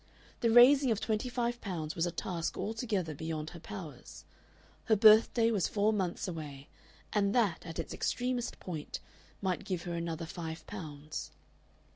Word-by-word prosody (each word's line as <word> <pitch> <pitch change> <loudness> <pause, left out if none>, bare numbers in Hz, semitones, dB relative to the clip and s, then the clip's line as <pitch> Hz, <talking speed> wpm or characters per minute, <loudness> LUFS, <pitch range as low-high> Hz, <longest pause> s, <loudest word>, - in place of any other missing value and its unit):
The 230 - +2
raising 255 +4 +7
of 220 -3 +2
twenty 220 +3 -1
five 240 -1 -1
pounds 160 -6 -4
was 170 +1 +1
a - - -2
task 170 0 -3
altogether 210 -7 -2
beyond 155 +1 -4
her 170 - -9
powers. 165 - -9 0.6
Her 220 - +4
birthday 220 +2 +6
was 200 -6 +1
four 210 +1 +2
months 185 -4 -1
away, 150 -5 -7 0.4
and 200 0 +2
that, 210 -9 +2
at 165 - -6
its - - -4
extremist 245 -1 -1
point, 160 -5 -5 0.4
might 185 -2 0
give 185 -4 -3
her 175 - -4
another 170 -1 -3
five 160 0 -6
pounds. 155 -6 -6
185 Hz, 155 wpm, -32 LUFS, 165-225 Hz, 0.6 s, raising